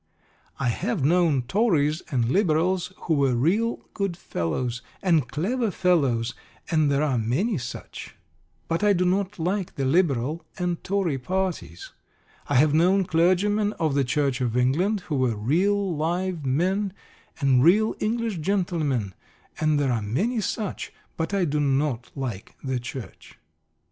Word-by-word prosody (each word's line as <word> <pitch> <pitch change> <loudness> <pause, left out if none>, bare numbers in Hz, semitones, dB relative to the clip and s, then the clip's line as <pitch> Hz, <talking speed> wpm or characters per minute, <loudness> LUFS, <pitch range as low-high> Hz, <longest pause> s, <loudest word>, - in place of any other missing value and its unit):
I 125 - +1
have 180 - -1
known 160 -5 +3
Tories 155 - +1
and 125 -4 +1
Liberals 180 +1 +1
who 165 - 0
were 135 -4 +2
real 200 - +1
good 195 -5 -2
fellows, 120 - -3 0.2
and 165 -8 +3
clever 210 - -1
fellows, 140 -11 +1 0.4
and 155 -3 +3
there 140 +1 +2
are 135 -5 +1
many 150 - 0
such; 120 0 -8 0.5
but 165 +5 -1
I 205 -1 +5
do 180 -1 +1
not 195 +2 0
like 185 +3 -2
the 135 -3 -1
Liberal 150 0 +1
and 180 -2 -2
Tory 185 -8 0
parties. 180 - -3 0.6
I - - 0
have 145 +3 +5
known 185 +5 +4
clergymen 195 +6 +2
of 155 -3 -1
the 140 0 +2
Church 135 0 0
of 120 -1 0
England 175 - +2
who 150 -4 -3
were 125 -3 +1
real 180 - +1
live 170 0 -2
men, 185 +8 0 0.5
and 135 -4 +4
real 210 +7 +4
English 225 -3 -1
gentlemen, 155 - -1 0.5
and 155 -2 +2
there 140 -3 +1
are 115 -2 0
many 195 - -1
such; 210 0 -3 0.2
but 160 +3 -2
I 195 -3 +1
do 150 -1 0
not 135 -3 0
like 120 -8 -5
the 130 -2 -1
Church. 120 -5 -9
160 Hz, 150 wpm, -25 LUFS, 130-190 Hz, 0.6 s, I